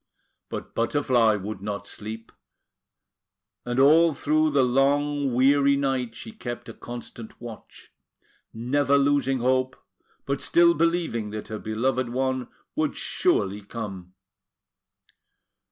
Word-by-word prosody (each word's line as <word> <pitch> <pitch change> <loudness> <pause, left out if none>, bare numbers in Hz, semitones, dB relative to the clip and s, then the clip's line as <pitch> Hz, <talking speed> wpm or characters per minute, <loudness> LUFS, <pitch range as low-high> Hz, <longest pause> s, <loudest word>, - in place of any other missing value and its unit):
But - - -6
Butterfly 115 -3 +2
would 100 0 -6
not 100 -1 -4
sleep; 110 +2 -8 1.3
and 120 +1 -1
all 155 +3 +6
through 155 +3 +2
the 140 -3 +3
long 140 +2 +2
weary 140 +3 +4
night, 135 -4 -1
she 225 - -8
kept 120 - -7
a - - -8
constant 120 -1 -9
watch, 120 -2 -11 0.6
never 135 +5 +1
losing 140 -2 +2
hope, 130 +1 +1 0.5
but 140 0 -2
still 170 0 +5
believing 165 -10 0
that 105 0 -7
her 110 -1 -5
beloved 120 +3 -1
one 130 0 -1 0.3
would - - -1
surely 100 +1 +1
come. 100 -4 -7
130 Hz, 115 wpm, -25 LUFS, 115-140 Hz, 1.3 s, all